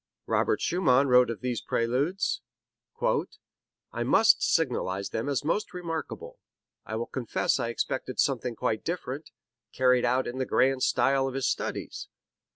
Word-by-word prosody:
Robert - - +1
Schumann 140 -7 +2
wrote 125 -1 +6
of 115 - -5
these 125 -2 -2
Preludes: 140 +12 0 1.5
"I - - -3
must - - +5
signalize 95 +1 0
them 115 +5 -3
as 140 -1 -1
most 180 +4 -1
remarkable. 180 - -5 0.5
I 110 - -4
will 115 +1 -2
confess 120 -3 -1
I 115 - -1
expected 130 +2 -3
something 125 -3 +1
quite 110 0 -1
different, 155 -4 -4 0.4
carried 125 -1 +3
out 125 +2 +2
in 125 +2 -5
the 130 - 0
grand 135 0 +2
style 135 0 +2
of 135 - -5
his 135 - 0
studies. - - -3
130 Hz, 145 wpm, -28 LUFS, 120-145 Hz, 1.5 s, wrote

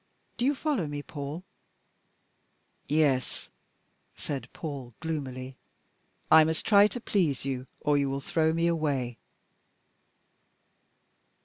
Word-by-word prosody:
Do 240 - -1
you 285 +2 +3
follow 275 - -1
me, 145 0 -5
Paul?" 145 +4 -6 1.4
"Yes." 145 -4 +1 0.6
said 140 -3 -5
Paul 135 -7 -6
gloomily. 135 -5 -4 0.7
"I 160 0 +9
must 160 0 -1
try 205 -1 +7
to 245 - -5
please 170 - 0
you, 130 -1 -3
or 145 -1 +3
you 140 -1 +1
will 135 0 -2
throw 160 +3 +1
me 165 +1 +1
away." 145 -8 0
150 Hz, 110 wpm, -28 LUFS, 135-165 Hz, 1.4 s, I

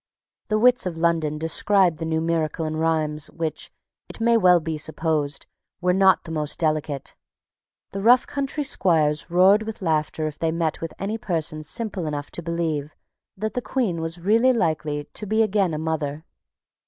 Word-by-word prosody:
The 215 - +1
wits 245 -2 +4
of 170 -2 -5
London 165 -2 +1
described 170 +1 +2
the 165 - -3
new 160 0 0
miracle 165 -1 -1
in 155 0 -3
rhymes 155 -2 0
which, 165 -2 -4 0.4
it - - -10
may 235 +1 +3
well 180 -5 +5
be 160 0 -4
supposed, 155 -1 -2 0.3
were 180 0 +2
not 190 -1 +4
the 165 - -8
most 150 -2 -2
delicate. 155 -3 -1 0.8
The 195 - -4
rough 245 +4 +5
country 280 +1 -3
squires 155 - +2
roared 190 +4 +5
with 220 0 -6
laughter 155 -1 0
if 150 -1 -5
they 165 -1 0
met 165 -1 -2
with 165 - -4
any 215 +3 -3
person 160 -5 -3
simple 190 +1 -3
enough 145 -1 -4
to - - -5
believe 160 -3 -2 0.4
that 215 +2 -3
the 250 - -2
Queen 215 -11 -1
was 165 +1 -4
really 225 +8 +3
likely 155 -8 -1
to 210 +7 -9
be 220 +2 +3
again 200 -4 +1
a 155 - -2
mother. 155 -1 -3
165 Hz, 175 wpm, -23 LUFS, 155-195 Hz, 0.8 s, well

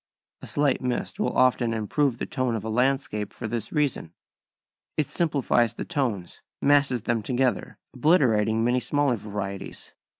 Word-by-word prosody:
A - - -9
slight 145 -2 +1
mist 125 +9 -3
will 210 - -1
often 120 -2 +3
improve 120 +4 0
the - - -3
tone 130 -2 -1
of 110 - -4
a 110 - -3
landscape 125 -4 0
for - - -6
this 115 -1 -4
reason. 140 - -1 0.8
It 155 - +2
simplifies 140 -8 +1
the - - -5
tones, 120 - -3 0.2
masses 140 -5 +3
them 115 -1 0
together, 125 -2 -1 0.2
obliterating 115 - +3
many 125 +2 +2
smaller 145 -1 +1
varieties. 100 -2 -6
125 Hz, 145 wpm, -25 LUFS, 110-140 Hz, 0.8 s, often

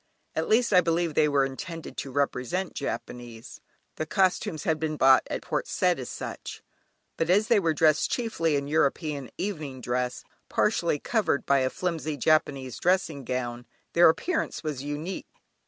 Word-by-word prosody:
At 160 - -1
least, 235 0 +3
I 180 - +7
believe 165 -1 0
they 150 - +4
were 140 -1 +3
intended 165 +5 -7
to 135 - -4
represent 145 +6 -1
Japanese 120 -2 -6 0.4
(the 155 - -3
costumes 180 -4 +1
had 160 -1 0
been 155 -1 -2
bought 135 -1 +6
at - - -3
Port - - -2
Said - - +1
as - - -6
such), - - -7 0.5
but 165 - 0
as 205 +5 +3
they 230 -3 +5
were 165 -4 +1
dressed 155 -1 +3
chiefly 165 - 0
in 140 0 -1
European 145 -2 0
evening 155 -10 -4
dress, 125 0 -2 0.3
partially 170 -7 +1
covered 205 -4 0
by 140 0 +4
a 130 0 +1
flimsy 160 -3 -3
Japanese 140 -4 +1
dressing 175 -6 +1
gown, 120 -1 -4 0.3
their 170 0 +7
appearance 320 - -1
was 150 -4 -3
unique. 145 +6 -5
155 Hz, 160 wpm, -27 LUFS, 135-175 Hz, 0.5 s, I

